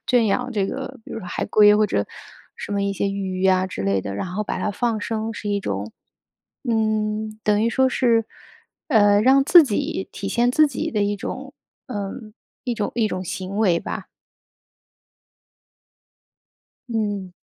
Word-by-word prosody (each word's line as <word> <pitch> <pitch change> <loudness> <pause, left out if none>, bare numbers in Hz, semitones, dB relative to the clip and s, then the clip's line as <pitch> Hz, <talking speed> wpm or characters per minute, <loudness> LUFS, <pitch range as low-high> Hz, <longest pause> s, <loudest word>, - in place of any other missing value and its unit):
圈 245 -3 +3
养 250 +5 0
这 200 -3 +1
个 265 -1 -6
比 - - -12
如 225 - -5
海 - - -3
龟 210 0 +6
或 215 0 +4
者， 100 - 0 0.5
什 - - -8
么 200 0 0
一 200 - 0
些 200 +1 -1
鱼 190 -1 -3
啊 185 0 +3
之 185 - -5
类 100 0 +1
的， 100 +1 -5
然 180 - -3
后 210 +3 -2
把 - - -3
它 210 - 0
放 225 +1 -1
生 220 +1 -3
是 205 - -5
一 205 - +1
种， 100 - -4 0.8
嗯， 215 -1 0
等 210 0 +2
于 230 - +3
说 265 +2 +3
是， 235 -4 +2 0.6
呃， 205 -6 +5
让 270 +4 +5
自 335 +2 +8
己 205 -4 -2
体 195 - -5
现 240 +4 +2
自 310 +2 +5
己 255 - -3
的 210 -2 0
一 205 0 0
种 265 +7 -6 0.3
呃， 205 -6 -4 0.5
一 245 - -1
种 210 -2 -2
一 230 -3 +2
种 185 -1 -3
行 190 +3 -5
为 180 -6 +3
吧。 - - -5 2.8
嗯。 205 -5 -2
210 Hz, 180 characters per minute, -22 LUFS, 195-230 Hz, 2.8 s, 自